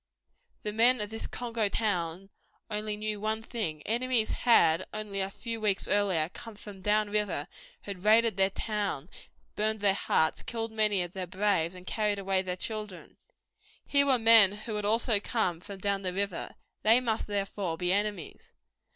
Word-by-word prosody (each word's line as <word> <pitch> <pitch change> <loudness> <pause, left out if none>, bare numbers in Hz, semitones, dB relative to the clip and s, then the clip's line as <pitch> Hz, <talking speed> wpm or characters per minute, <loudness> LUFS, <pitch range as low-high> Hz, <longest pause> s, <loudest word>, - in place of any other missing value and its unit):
The 210 - -3
men 240 +3 +4
of 210 0 -4
this 225 - -4
Congo 230 -4 -2
town 190 -3 -2 0.4
only 210 0 -2
knew 215 0 -3
one 220 +1 -1
thing. 165 -11 -4
Enemies 240 0 0
had, 170 -8 +4
only 210 -2 -3
a 190 - -1
few 230 +2 -6
weeks 205 -2 +1
earlier, 190 -6 +2
come 225 -2 -10
from 205 -2 -11
down 210 +1 +1
river, 205 -8 -1 0.3
had 195 -3 -8
raided 220 0 +4
their 190 0 +3
town, 200 -7 -3 0.5
burned 215 +1 0
their 200 -1 +4
huts, 160 -4 +1
killed 225 -1 -4
many 210 -4 +2
of 175 0 -8
their 185 -2 -5
braves, 185 -2 0
and 180 0 -12
carried 210 -1 0
away 195 -1 0
their 185 -1 -3
children. 210 -3 -6 0.7
Here 280 0 +3
were 265 -2 +4
men 225 -4 +7
who 215 +2 -6
had 210 -1 -2
also 225 0 +3
come 200 -6 -1
from 200 +1 -9
down 200 +1 -1
the 185 -2 -3
river. 195 -2 -3 0.3
They 225 +3 +5
must, 230 -3 -1
therefore, 195 -4 -3
be 180 +1 +1
enemies. 205 -4 -3
210 Hz, 170 wpm, -29 LUFS, 190-220 Hz, 0.7 s, men